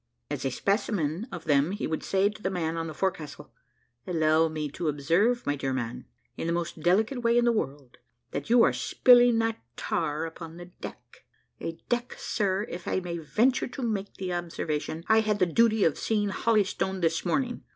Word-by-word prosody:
As -, -, -3 dB
a -, -, +2 dB
specimen 195 Hz, -, -1 dB
of 170 Hz, -, -6 dB
them, 145 Hz, +3 st, +3 dB
he 205 Hz, -, -3 dB
would 160 Hz, -, -2 dB
say 195 Hz, +1 st, +2 dB
to 210 Hz, 0 st, -6 dB
the 190 Hz, -, 0 dB
man 165 Hz, -3 st, -2 dB
on 165 Hz, 0 st, -3 dB
the 160 Hz, -, -6 dB
forecastle, 155 Hz, -6 st, -3 dB, 0.6 s
"Allow 160 Hz, -2 st, +3 dB
me 155 Hz, -1 st, -3 dB
to 165 Hz, -, -3 dB
observe, 170 Hz, -, +2 dB
my 145 Hz, -, +1 dB
dear 135 Hz, -1 st, -2 dB
man, 120 Hz, -2 st, -4 dB, 0.3 s
in -, -, -3 dB
the 170 Hz, -, +1 dB
most 170 Hz, -1 st, -3 dB
delicate 220 Hz, -, +2 dB
way 235 Hz, 0 st, +3 dB
in 240 Hz, -, +4 dB
the 240 Hz, -, +5 dB
world, 140 Hz, -, -4 dB, 0.3 s
that 140 Hz, -, -4 dB
you 235 Hz, 0 st, +6 dB
are -, -, +4 dB
spilling 245 Hz, -2 st, +5 dB
that 225 Hz, 0 st, 0 dB, 0.2 s
tar 150 Hz, +2 st, -1 dB
upon 165 Hz, 0 st, -8 dB
the 175 Hz, -, -8 dB
deck 175 Hz, -, -11 dB, 0.4 s
a 165 Hz, -, -4 dB
deck, 240 Hz, 0 st, -1 dB
sir, 200 Hz, -2 st, 0 dB
if 175 Hz, 0 st, -7 dB
I -, -, +1 dB
may 175 Hz, -2 st, -4 dB
venture 230 Hz, -, +1 dB
to 260 Hz, +1 st, -6 dB
make 205 Hz, -4 st, -2 dB
the 185 Hz, -2 st, -3 dB
observation, 165 Hz, -2 st, -3 dB
I 220 Hz, 0 st, +5 dB
had 215 Hz, -1 st, +1 dB
the 185 Hz, -, +3 dB
duty 220 Hz, +4 st, +3 dB
of 160 Hz, -, +2 dB
seeing 210 Hz, -2 st, 0 dB
holystoned 195 Hz, -3 st, 0 dB
this 165 Hz, 0 st, +1 dB
morning. 245 Hz, +6 st, -1 dB
180 Hz, 195 wpm, -28 LUFS, 160-220 Hz, 0.6 s, you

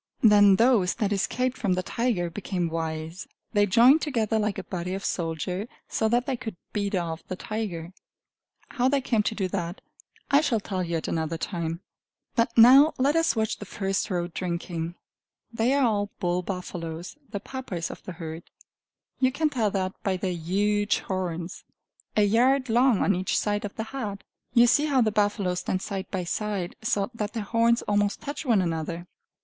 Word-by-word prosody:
Then 205 Hz, -3 st, +7 dB
those 225 Hz, -4 st, +3 dB
that 210 Hz, -1 st, 0 dB
escaped 255 Hz, +6 st, -1 dB
from 200 Hz, -5 st, +1 dB
the 185 Hz, 0 st, -1 dB
tiger 200 Hz, -7 st, -1 dB
became 180 Hz, -2 st, -2 dB
wise; 160 Hz, +2 st, -4 dB, 0.3 s
they 205 Hz, -1 st, +4 dB
joined 245 Hz, +10 st, +6 dB
together 225 Hz, -7 st, 0 dB
like 210 Hz, -1 st, -1 dB
a 195 Hz, -, -4 dB
body 180 Hz, 0 st, -4 dB
of 195 Hz, -, -5 dB
soldiers, 175 Hz, +4 st, -2 dB, 0.2 s
so 220 Hz, -, 0 dB
that 240 Hz, +2 st, +2 dB
they 270 Hz, -, -1 dB
could 235 Hz, -5 st, -6 dB, 0.2 s
beat 205 Hz, -1 st, -1 dB
off 165 Hz, -2 st, -2 dB
the 185 Hz, -, -4 dB
tiger. 185 Hz, -5 st, -5 dB, 0.8 s
How 255 Hz, -2 st, +1 dB
they 280 Hz, +1 st, +2 dB
came 235 Hz, -4 st, +1 dB
to 220 Hz, +1 st, -2 dB
do 195 Hz, -3 st, -1 dB
that, 175 Hz, -1 st, -3 dB, 0.5 s
I 280 Hz, +1 st, +6 dB
shall 245 Hz, -7 st, +1 dB
tell 190 Hz, -2 st, -3 dB
you 170 Hz, -1 st, -1 dB
at 160 Hz, -, -4 dB
another 160 Hz, 0 st, -1 dB
time. 170 Hz, -1 st, -3 dB, 0.5 s
But 230 Hz, -1 st, +1 dB
now 265 Hz, +7 st, +8 dB
let 280 Hz, +4 st, +2 dB
us 330 Hz, -3 st, +3 dB
watch 220 Hz, -1 st, 0 dB
the -, -, -7 dB
first 195 Hz, -1 st, -2 dB
row 175 Hz, -3 st, 0 dB
drinking. 170 Hz, -1 st, -4 dB, 0.6 s
They 230 Hz, +2 st, +1 dB
are 280 Hz, -2 st, +3 dB
all 205 Hz, -3 st, +1 dB
bull 175 Hz, 0 st, 0 dB
buffaloes, 175 Hz, -, -5 dB
the 205 Hz, -1 st, -4 dB
Papas 205 Hz, -8 st, -5 dB
of -, -, -10 dB
the 185 Hz, -, -7 dB
herd; 160 Hz, -1 st, -7 dB, 0.8 s
you 255 Hz, -1 st, +3 dB
can 305 Hz, +2 st, 0 dB
tell 225 Hz, -6 st, +1 dB
that 190 Hz, -1 st, -2 dB
by 190 Hz, -2 st, 0 dB
their 185 Hz, 0 st, -2 dB
huge 205 Hz, +5 st, +1 dB
horns, 180 Hz, -2 st, -4 dB, 0.5 s
a 210 Hz, -, +5 dB
yard 255 Hz, +5 st, +3 dB
long 240 Hz, -1 st, +4 dB
on 200 Hz, -, +3 dB
each 185 Hz, +1 st, 0 dB
side 205 Hz, +1 st, 0 dB
of 200 Hz, -, -7 dB
the 220 Hz, -, -3 dB
head. 220 Hz, -5 st, -5 dB, 0.3 s
You 235 Hz, 0 st, +8 dB
see 290 Hz, +5 st, +4 dB
how 275 Hz, -4 st, +3 dB
the 220 Hz, -2 st, +2 dB
buffaloes 205 Hz, -3 st, +1 dB
stand 185 Hz, -, -2 dB
side 195 Hz, -2 st, -4 dB
by 185 Hz, -2 st, -2 dB
side, 195 Hz, 0 st, -3 dB
so 205 Hz, -1 st, 0 dB
that 215 Hz, -2 st, -4 dB
their 225 Hz, -3 st, -3 dB
horns 230 Hz, +2 st, +2 dB
almost 205 Hz, 0 st, +1 dB
touch 290 Hz, +1 st, -6 dB
one 215 Hz, -6 st, +4 dB
another. 170 Hz, 0 st, -3 dB
205 Hz, 185 wpm, -26 LUFS, 180-230 Hz, 0.8 s, now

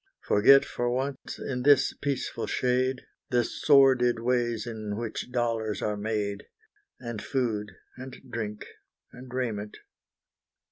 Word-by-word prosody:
Forget 135 Hz, +7 st, +6 dB
for 120 Hz, 0 st, -2 dB
once, 130 Hz, +2 st, -3 dB
in 125 Hz, -2 st, -4 dB
this 145 Hz, +1 st, +4 dB
peaceful 140 Hz, -2 st, -3 dB
shade, 130 Hz, +1 st, 0 dB, 0.2 s
The 120 Hz, -1 st, +2 dB
sordid 130 Hz, -2 st, +4 dB
ways 120 Hz, -2 st, 0 dB
in 110 Hz, -3 st, -5 dB
which 115 Hz, +1 st, -5 dB
dollars 115 Hz, -3 st, -1 dB
are 105 Hz, -, 0 dB
made, 105 Hz, -1 st, -3 dB, 0.5 s
And 120 Hz, -3 st, -6 dB
food 110 Hz, -7 st, -2 dB, 0.2 s
and 130 Hz, 0 st, -8 dB
drink 110 Hz, -4 st, -5 dB, 0.5 s
and 125 Hz, 0 st, -12 dB
raiment. 110 Hz, -5 st, -3 dB
120 Hz, 120 wpm, -27 LUFS, 110-130 Hz, 0.5 s, Forget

